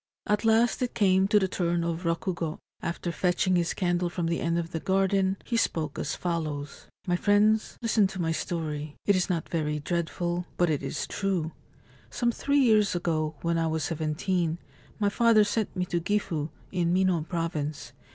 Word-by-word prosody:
At 210 +1 +1
last 225 +3 +3
it 250 - -1
came 190 -2 +4
to 210 - +4
the 190 -2 +3
turn 175 -2 0
of 170 +1 -3
Rokugo. 165 -1 -1 0.2
After 170 +1 -3
fetching 180 +2 +1
his 175 -1 +1
candle 175 -1 0
from 175 0 -3
the 170 0 0
end 170 0 0
of 170 -1 -3
the 160 - -2
garden, 190 +1 +1
he 240 - -2
spoke 155 -9 -1
as - - -2
follows: 155 -5 -4 0.2
4 - - -6
My - - +4
friends, 210 +3 +3
listen 220 -3 +3
to 190 -1 -8
my 165 -2 0
story. 155 -3 -3
It 200 - +4
is 185 +1 +1
not 170 -3 -1
very 150 -2 -1
dread 170 +2 -1
ful; 175 0 -2
but 175 -2 +3
it 145 - 0
is 135 - -3
true. 185 -5 -1 0.6
Some 240 -1 0
three 280 +4 0
years 215 -6 +4
ago, 160 -3 -1
when 170 0 +1
I 165 - +1
was 160 -1 -1
seventeen, 165 +1 -1 0.4
my 205 -2 +2
father 225 0 +5
sent 210 0 -1
me 180 -1 0
to 175 -1 -1
Gifu, 165 -6 -1 0.2
in 175 -2 +1
Mino 185 -2 +2
Province. 155 -5 -3
175 Hz, 190 wpm, -27 LUFS, 165-195 Hz, 0.6 s, father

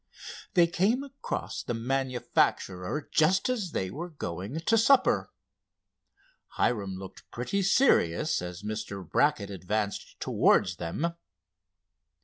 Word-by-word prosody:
They 175 -2 +7
came 195 +10 +1
across 275 0 -5
the 120 - -3
manufacturer 125 -3 -1
just 185 +8 +3
as 220 -8 -1
they 95 - -2
were 170 - -5
going 100 - -5
to 225 - +2
supper. 250 +4 +4 1.3
Hiram 100 -5 0
looked 95 0 -11
pretty 125 +12 -2
serious 170 - +3
as 90 +2 -7
Mr. 105 -3 -5
Brackett 130 - +1
advanced 100 +2 -3
towards - - +3
them. 150 - -2
125 Hz, 110 wpm, -28 LUFS, -, 1.3 s, They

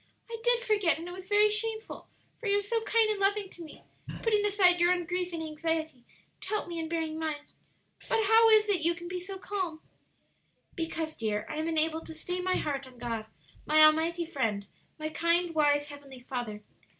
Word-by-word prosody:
"I 460 - -4
did 485 -1 +4
forget, 415 -9 +2
and 330 +2 -7
it - - -6
was 375 0 -10
very 415 +1 +5
shameful, 440 +1 -1 0.3
for 460 - -5
you 400 0 +3
are - - +1
so 455 +3 0
kind 450 0 +3
and 420 - -2
loving 395 0 +1
to 350 - -10
me, 315 - -13 0.4
putting 425 -3 +2
aside 365 -4 +4
your 350 +1 +5
own 355 -1 0
grief 360 +1 -2
and 330 -1 -4
anxiety 315 -4 -3 0.3
to - - -7
help 425 -3 -1
me 340 -1 -5
in 320 -1 -4
bearing 320 -1 -2
mine. 305 -2 -3 0.6
But 445 - +2
how 450 +2 +6
is 430 -1 +6
it 390 -5 +1
yon 335 +2 +2
can 345 0 -9
be 360 +1 -4
so 385 +2 -7
calm?" 375 -4 -4 0.9
"Because, 325 -2 -4
dear, 210 -2 -2
I 305 - -5
am 315 +1 -2
enabled 320 0 0
to 320 - -8
stay 360 +3 -4
my 370 0 0
heart 275 -3 -2
on 255 -1 -16
God, 230 -2 -4 0.4
my 310 +1 +7
Almighty 325 +2 +4
Friend, 225 -11 -2 0.3
my 310 0 -4
kind, 335 +2 +1
wise, 290 -1 +2
Heavenly 280 -3 -11
Father. 240 -5 -5
335 Hz, 205 wpm, -29 LUFS, 310-395 Hz, 0.9 s, my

